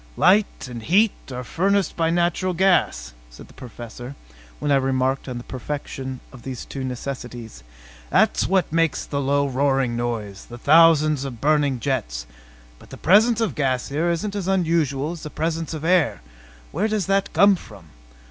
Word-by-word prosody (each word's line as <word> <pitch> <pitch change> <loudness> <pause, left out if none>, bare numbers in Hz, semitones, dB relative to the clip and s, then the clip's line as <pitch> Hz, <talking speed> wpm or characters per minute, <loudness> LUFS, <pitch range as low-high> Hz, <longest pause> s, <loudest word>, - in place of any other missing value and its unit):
"Light 200 -5 +3
and 120 -2 -7
heat 200 - +3 0.2
are 125 0 -5
furnished 195 +7 0
by 165 -1 +1
natural 175 +2 0
gas," 170 - +1 0.2
said - - -13
the - - -18
Professor 120 +2 -9 0.4
when 145 - -2
I - - +5
remarked 130 0 0
on 125 - -5
the 120 - -7
perfection 130 0 -6
of 130 - -12
these 130 -1 -7
two 135 - -6
necessities. 125 - -6 0.5
"That's - - +2
what 190 -4 +1
makes 165 -4 +1
the 140 -1 -3
low 140 +1 +1
roaring 135 -2 +1
noise 115 -5 -4
the 120 - -9
thousands 155 0 +5
of 130 -4 -6
burning 145 -2 +2
jets. - - -2 0.5
But - - -17
the - - -10
presence 220 +6 +4
of 215 -10 0
gas 130 -3 -1
here 155 +5 0
isn't 170 +5 -2
as 195 -3 -3
unusual 165 -6 +1
as 170 -2 -8
the 155 - -6
presence 160 +1 -3
of 160 -1 -5
air. 175 - +2 0.5
Where 195 +8 0
does 215 -4 -1
that 195 0 0
come 200 0 +5
from? 105 - -13
145 Hz, 170 wpm, -22 LUFS, 125-170 Hz, 0.5 s, I